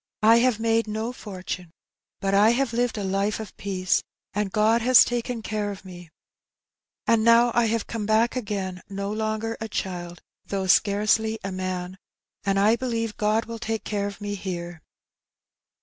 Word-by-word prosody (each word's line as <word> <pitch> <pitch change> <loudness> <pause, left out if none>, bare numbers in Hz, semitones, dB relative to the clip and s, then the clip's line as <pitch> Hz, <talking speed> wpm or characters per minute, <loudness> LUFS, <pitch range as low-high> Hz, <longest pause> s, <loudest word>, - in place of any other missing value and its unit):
" - - -66
I - - +6
have 240 -2 +2
made 225 0 +1
no 220 +3 -3
fortune, 185 -5 -6 0.5
but 195 0 0
I 205 +2 +6
have 270 -4 0
lived 240 -1 0
a 205 - -2
life 195 +2 0
of 220 -3 -8
peace, 185 -2 0 0.3
and 205 -1 -1
God 220 +3 +3
has 255 +2 +7
taken 240 -1 -3
care 210 -1 -2
of 200 -1 -8
me, 175 -2 -11 1.0
and 230 -1 +3
now 235 +1 +6
I 240 - +3
have 225 -1 0
come 220 -3 -4
back 220 +3 +3
again 195 -6 -3
no 200 0 -3
longer 220 +1 -2
a 220 - -3
child, 175 -3 -5 0.2
though 195 -1 -3
scarcely 215 +3 +3
a 195 - -3
man, 185 0 -4 0.4
and 195 -1 +1
I 210 +3 +4
believe 230 -3 -2
God 215 +2 +1
will 230 0 -7
take 225 -1 -3
care 205 -1 -2
of 200 - -8
me 205 -1 -4
here.' 175 -4 -5
210 Hz, 175 wpm, -25 LUFS, 195-225 Hz, 1.0 s, has